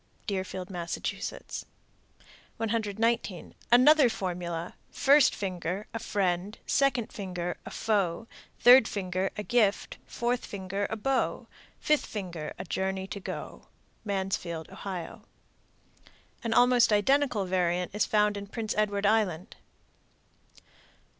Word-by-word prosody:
Deerfield, 190 -1 -4
Mass. 175 -2 -3
119. 225 -3 -4 0.2
Another 265 +2 +7
formula: 175 -4 -4 0.2
(First 280 0 +4
finger) 185 +1 -3
a 225 - -3
friend, 195 0 -1
(Second 260 -5 +1
finger) 180 -3 -4
a - - -4
foe, 200 -2 0 0.3
(Third 245 -1 +8
finger) 185 -1 -2
a 210 - -3
gift, 215 -3 +1
(Fourth 240 +1 -1
finger) 195 0 -3
a 220 - -2
beau, 265 +4 -1 0.3
(Fifth 300 -1 +1
finger) 175 -7 -5
a - - -5
journey 190 +2 -2
to 200 +1 -6
go. - - -7 0.4
Mansfield, 190 -5 -3
O. 185 -4 -6 1.2
An 230 - -2
almost 245 0 +5
identical 245 0 +2
variant 180 -1 0
is 210 - +1
found 210 -1 +2
in 200 0 -6
Prince 220 +1 -3
Edward 205 -1 0
Island. 205 -3 +1
200 Hz, 110 wpm, -28 LUFS, 185-225 Hz, 1.2 s, Third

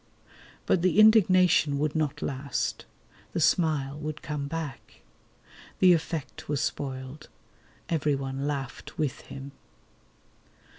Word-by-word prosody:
But 175 - +2
the 185 +3 +3
indignation 185 -8 +5
would 150 +1 -1
not 150 -1 -1
last. 140 0 -3 0.5
The - - -1
smile 150 -4 +1
would 155 0 -5
come 145 -2 -3
back. 160 -2 -6 0.8
The 185 -1 +6
effect 160 -4 -3
was 145 -2 0
spoiled. 130 +1 -4 0.6
Everyone 140 -3 -1
laughed 135 -5 -5
with 150 -4 -2
him. 135 +1 -8
150 Hz, 105 wpm, -27 LUFS, 140-165 Hz, 0.8 s, The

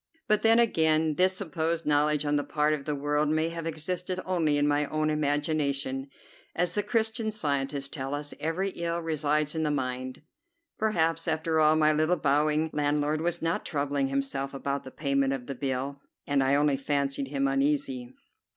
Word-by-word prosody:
But 210 0 +3
then, 225 +1 +5
again, 160 -8 +3
this 185 +4 +3
supposed 165 -2 -2
knowledge 150 0 +2
on 145 0 +1
the 145 - +1
part 150 +1 +1
of 140 -2 -4
the 150 - -1
world 145 +1 0
may 155 +1 +1
have 165 -1 -5
existed 180 +3 -3
only 165 -5 +1
in 145 0 +2
my 145 0 +1
own 155 +1 0
imagination, 145 -2 -1 0.5
as 175 0 +1
the 205 - +1
Christian 220 +1 0
Scientists 140 -8 -2
tell 135 0 -4
us 145 0 -5
every 165 +5 -1
ill 170 -1 -2
resides 150 -2 0
in 160 - -2
the 155 - +1
mind. 130 -1 -3 0.6
Perhaps, 165 -6 +1
after 160 0 +1
all, 155 0 +5
my 155 -1 +4
little 155 +4 +2
bowing 150 +2 +1
landlord 150 +1 0
was 170 0 -1
not 165 +1 0
troubling 140 -2 -1
himself 135 0 -2
about 140 0 -3
the - - -7
payment 140 -1 0
of 130 -2 -5
the 140 - -4
bill, 135 +1 -3 0.2
and 140 -1 +2
I 135 +1 +3
only 145 -1 +2
fancied 140 0 -1
him 135 0 0
uneasy. 135 -2 0
150 Hz, 180 wpm, -28 LUFS, 140-160 Hz, 0.6 s, then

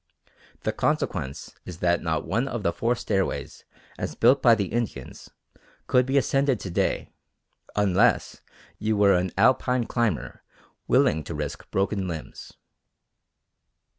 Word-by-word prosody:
The - - 0
consequence 70 +2 -2
is 90 - -8
that 85 0 +1
not 80 -1 -1
one 120 +4 0
of 120 -5 -4
the 85 - +1
four 120 +1 0
stairways 95 -5 -3 0.3
as - - -4
built 130 +4 +4
by 120 -3 +6
the 100 -3 -1
Indians 110 - -4 0.6
could 125 0 +3
be 135 +1 +1
ascended 135 -2 +2
to 95 - -6
day - - -1 0.6
unless 105 +3 +2 0.4
you 110 0 0
were 100 -1 +5
an 90 0 0
Alpine 125 0 +3
climber 115 -10 -2 0.5
willing 80 0 +3
to - - -6
risk - - -5
broken 95 0 -1
limbs. 80 -3 -7
105 Hz, 135 wpm, -25 LUFS, 90-120 Hz, 0.6 s, by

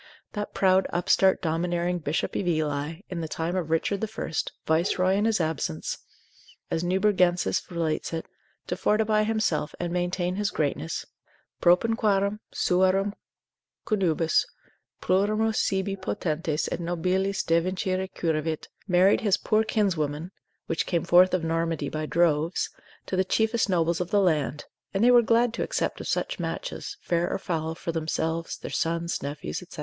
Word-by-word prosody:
That 205 -1 -4
proud 190 0 +4
upstart 190 +2 +3
domineering 175 +2 0
Bishop 150 0 -2
of 185 - -1
Ely, 155 0 -1
in 175 -2 -3
the 160 - -3
time 165 +3 -3
of 175 -4 -2
Richard 165 +5 0
the 220 - 0
First, 205 -6 -3
viceroy 180 +3 +2
in 205 +2 +2
his 225 -2 +2
absence, 155 - -2 0.7
as 165 - 0
Nubergensis 180 -1 +2
relates 165 -3 -2
it, 165 -1 -3 0.4
to - - -2
fortify 215 0 +2
himself, 215 -9 0
and 175 -1 -2
maintain 180 +1 -1
his 205 -1 0
greatness, 140 - -2 0.6
propinquarum 200 +2 +3
suarum 190 +2 +2 0.7
connubiis, 170 -6 +2 0.6
plurimos 215 +4 +2
sibi 195 0 0
potentes 160 -4 -2
et - - -2
nobiles 185 +3 0
devincire 185 +2 0
curavit, 160 -1 -2 0.2
married 185 +1 +4
his 205 -4 +3
poor 215 0 +2
kinswomen 170 -7 -1 0.3
(which 165 - -1
came 170 -2 0
forth 180 +2 +6
of 180 -3 0
Normandy 165 -3 -1
by 155 +1 -3
droves) 165 0 +1 0.3
to - - -3
the 185 - +3
chiefest 220 +3 +1
nobles 170 -1 +1
of 180 - -3
the 205 0 +3
land, 150 -6 +1 0.3
and 195 - +2
they 245 - +7
were 240 -1 +7
glad 230 +1 +3
to - - -3
accept - - -2
of - - -6
such - - -1
matches, - - -4
fair 170 0 0
or - - -1
foul, 160 -3 -3
for 170 - -4
themselves, 160 0 -2
their - - -7
sons, 170 +1 -1
nephews, 140 - -4
&c. - - -10
180 Hz, 150 wpm, -26 LUFS, 165-195 Hz, 0.7 s, they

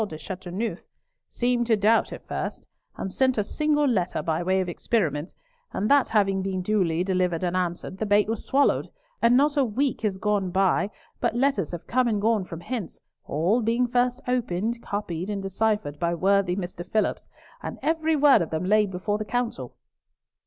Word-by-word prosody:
de 155 - -8
Chateauneuf, 190 +6 -5 0.5
seemed 240 -1 0
to 225 - +4
doubt 215 +2 +3
at - - -9
first, - - -4 0.3
and 190 - -4
sent 260 -2 +2
a 210 - +2
single 295 +6 +1
letter 190 -8 0
by 160 0 0
way 185 +2 +1
of 185 - -1
experiment, 170 -4 -1 0.4
and 210 +6 -1
that 285 -1 +5
having 195 -3 +2
been 190 -1 -2
duly 180 -5 +1
delivered 180 -2 0
and 180 0 0
answered, 185 +1 -3
the 220 - 0
bait 205 0 +4
was 225 -1 -3
swallowed, 280 +1 +2 0.3
and 235 +1 +5
not 290 +2 +3
a 285 - +4
week 255 +3 -1
has 205 -4 -1
gone 200 -1 0
by 190 +2 +2 0.3
but - - 0
letters 275 +3 +1
have 175 -1 -6
come 250 +1 +1
and 215 -3 +1
gone 215 -1 +2
from 170 -2 -8
hence, 230 -3 -5 0.3
all 180 +11 +1
being 235 +3 +2
first 245 +1 +1
opened, 235 -2 -1
copied, 185 -3 -4
and 200 -2 -3
deciphered 195 -6 -1
by 170 0 0
worthy 190 0 +2
Mr. 180 -2 -5
Phillipps, 215 +4 -1 0.3
and - - -6
every 320 +1 +1
word 290 -5 +6
of 165 - -2
them 160 +3 -2
laid 210 +1 +3
before 195 +3 -2
the - - -1
Council." 230 - -3
205 Hz, 185 wpm, -25 LUFS, 180-240 Hz, 0.5 s, word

